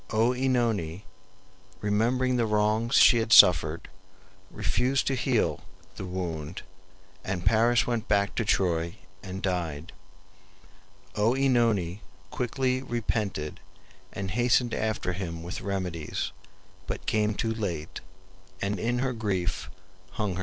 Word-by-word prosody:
OEnone, 115 -7 +1 0.8
remembering 120 +5 +1
the 120 -2 +1
wrongs 105 +3 +1
she 120 - +7
had 115 0 -2
suffered, 80 -6 +6 0.6
refused 125 +6 0
to 135 - 0
heal 125 -2 0 0.3
the 95 - -6
wound, 85 -3 -5 0.6
and 90 -2 -3
Paris 120 +2 +4
went 120 -2 -2
back 100 -1 +2
to - - -1
Troy 85 -5 0 0.3
and 95 0 -7
died. 85 -4 -2 1.2
OEnone 115 -5 +2 0.3
quickly 130 +1 -1
repented, 110 - -3 0.5
and 95 -1 -5
hastened 120 +1 +2
after 110 -4 -1
him 85 -3 -5
with 90 +2 -6
remedies, 90 -6 -3 0.6
but - - -5
came 105 -1 +1
too 110 +1 -1
late, 85 -8 -4 0.6
and 100 0 -2
in 120 +4 0
her 130 - -1
grief 100 -5 -2 0.4
hung 105 -3 -2
herself. 90 - -4
105 Hz, 115 wpm, -27 LUFS, 90-120 Hz, 1.2 s, she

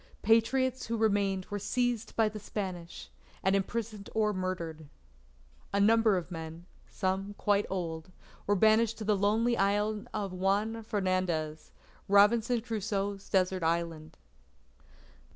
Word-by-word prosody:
Patriots 255 +4 +2
who 230 0 -1
remained 200 -3 +1
were 205 - -2
seized 245 +1 -1
by 225 -1 +3
the 215 0 -5
Spanish, 185 -4 -6 0.3
and 190 +1 +3
imprisoned 210 +1 -3
or 215 -1 +2
murdered. 170 -5 -4 0.8
A 200 - +1
number 220 0 +4
of 180 0 -5
men, 165 0 -7 0.2
some 195 +1 -2
quite 205 0 +1
old, 170 -2 -4 0.4
were 205 - +3
banished 220 +2 +4
to 220 - -5
the 210 0 +2
lonely 220 +4 +2
island 205 +1 0
of 200 -3 -3
Juan 200 +5 0
Fernandez 185 -7 -2 0.4
Robinson 220 +4 +4
Crusoe's 205 -3 -3
desert 185 -1 +1
island. 165 -1 -2
200 Hz, 125 wpm, -30 LUFS, 185-220 Hz, 0.8 s, number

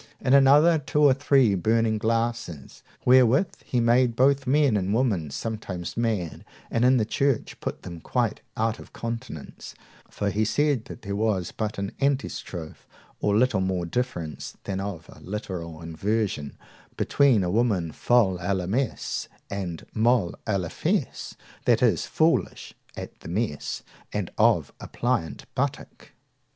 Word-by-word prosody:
In 130 - +1
another, 145 +4 +6
two 150 +1 0
or 140 -2 +7
three 135 -5 +3
burning 110 +3 +1
glasses, 115 - -2 0.2
wherewith 130 - +5
he 125 - -1
made 120 +1 +3
both 135 +2 +3
men 140 -3 +3
and 100 +1 0
women 105 - +1
sometimes 100 0 -5
mad, 110 -8 -2 0.3
and 115 - +1
in 130 +1 +5
the 110 - +2
church 135 +2 0
put - - -5
them 85 -2 -7
quite - - -1 0.2
out 115 0 0
of - - -13
countenance; 115 - -7 0.3
for 100 0 -2
he 105 +3 +1
said 140 +1 +1
that - - -10
there 100 -1 -3
was 100 -4 0
but 110 -1 -3
an 100 0 -3
antistrophe, 130 - -2 0.3
or 105 0 +2
little 120 -4 +3
more 95 -2 -1
difference 85 - -4
than 95 -1 -3
of 95 -5 -5
a - - -14
literal 90 -5 -6
inversion, 95 -2 -2 0.4
between 130 -8 +3
a 90 - -1
woman 100 -7 +1
folle 100 -2 +2
a 95 +3 0
la 90 -2 -2
messe 120 +7 -2 0.2
and 90 -5 -4
molle 110 -5 +2
a 105 -3 +2
la 90 -3 -3
fesse, - - -2 0.3
that - - +3
is, - - +2
foolish - - 0 0.2
at - - -8
the - - -10
mass 95 -5 -2 0.3
and - - -3
of - - +3
a - - -8
pliant 80 - -2
buttock. - - -4
110 Hz, 150 wpm, -26 LUFS, 95-125 Hz, 0.4 s, or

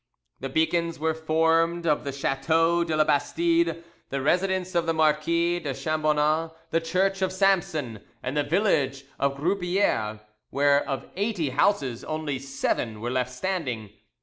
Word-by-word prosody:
The 135 - -4
beacons 165 +3 0
were 160 +1 0
formed 165 +2 +1
of 150 -2 +1
the 140 - -2
chateau 165 +5 +1
de 165 -2 -2
la 155 - +5
Bastide, 165 +3 +1 0.3
the 140 - -2
residence 185 +5 0
of 170 -1 +1
the 165 - +1
Marquis 165 +3 +2
de 145 -5 -4
Chambonnas, 155 0 +1 0.2
the 165 - +2
church 190 +4 0
of 190 -1 +1
Samson, 185 - +1 0.2
and 125 +3 -3
the 150 - +3
village 145 -5 +1
of 140 0 0
Grouppieres, 175 - 0 0.3
where 140 0 +3
of 135 - -3
eighty 195 -6 -1
houses 135 - +1
only 155 -3 -3
seven 135 -5 -2
were 120 +3 -3
left 125 -1 0
standing. 125 - -3
160 Hz, 150 wpm, -26 LUFS, 140-170 Hz, 0.3 s, la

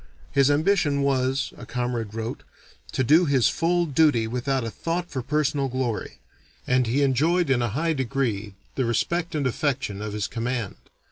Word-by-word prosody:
His 140 0 +4
ambition 145 -2 +2
was, 135 0 0
a 120 - -9
comrade 120 -3 -3
wrote, 115 +1 -4 0.5
to 130 - 0
do 155 +8 +5
his 135 -5 +3
full 175 +1 +1
duty 145 -6 +3
without 125 +3 -1
a 115 - -4
thought 170 +6 -3
for 130 - -2
personal 145 0 0
glory; 125 - -3 0.5
and 125 -1 +2
he 135 +5 +2
enjoyed 150 +4 +2
in 125 -2 +3
a 120 - 0
high 160 +9 0
degree 115 -7 -2 0.2
the 130 - 0
respect 170 +8 -1
and 145 -2 0
affection 130 -5 -1
of 105 -1 -4
his 105 -2 -2
command. 120 -2 -3
130 Hz, 165 wpm, -25 LUFS, 120-150 Hz, 0.5 s, do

